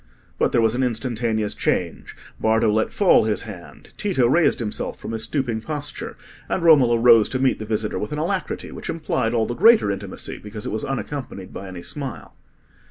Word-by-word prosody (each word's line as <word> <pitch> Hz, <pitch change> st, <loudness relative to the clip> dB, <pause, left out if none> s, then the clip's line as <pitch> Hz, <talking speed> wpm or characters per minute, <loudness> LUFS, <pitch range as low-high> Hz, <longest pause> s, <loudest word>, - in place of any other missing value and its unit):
But -, -, +2 dB
there 120 Hz, -, +3 dB
was 115 Hz, -1 st, +3 dB
an 125 Hz, -, -1 dB
instantaneous 115 Hz, -3 st, -1 dB
change: -, -, -2 dB, 0.2 s
Bardo 110 Hz, 0 st, +3 dB
let 110 Hz, +1 st, +1 dB
fall 190 Hz, -, +4 dB
his 110 Hz, -1 st, -1 dB
hand, 95 Hz, -6 st, -11 dB
Tito 185 Hz, -, +1 dB
raised 160 Hz, +6 st, +3 dB
himself 110 Hz, -3 st, -4 dB
from -, -, -7 dB
his 110 Hz, 0 st, -2 dB
stooping 120 Hz, -4 st, -2 dB
posture, 145 Hz, +3 st, -5 dB, 0.3 s
and 185 Hz, -, -1 dB
Romola 135 Hz, -8 st, +6 dB
rose 115 Hz, -2 st, +6 dB
to 130 Hz, -, -1 dB
meet 130 Hz, 0 st, +1 dB
the 110 Hz, -, -6 dB
visitor 110 Hz, -1 st, -1 dB
with 105 Hz, -, -4 dB
an 150 Hz, -, -3 dB
alacrity 180 Hz, +4 st, -3 dB
which -, -, -8 dB
implied 140 Hz, -7 st, -1 dB
all 110 Hz, -1 st, +2 dB
the 120 Hz, -, -3 dB
greater 215 Hz, -, +5 dB
intimacy, 100 Hz, -1 st, -6 dB
because 105 Hz, 0 st, -8 dB
it -, -, -3 dB
was 110 Hz, +1 st, -2 dB
unaccompanied 135 Hz, -8 st, -5 dB
by 95 Hz, -, -7 dB
any 90 Hz, -2 st, -8 dB
smile. 135 Hz, -, -6 dB
115 Hz, 190 wpm, -22 LUFS, 110-140 Hz, 0.3 s, Romola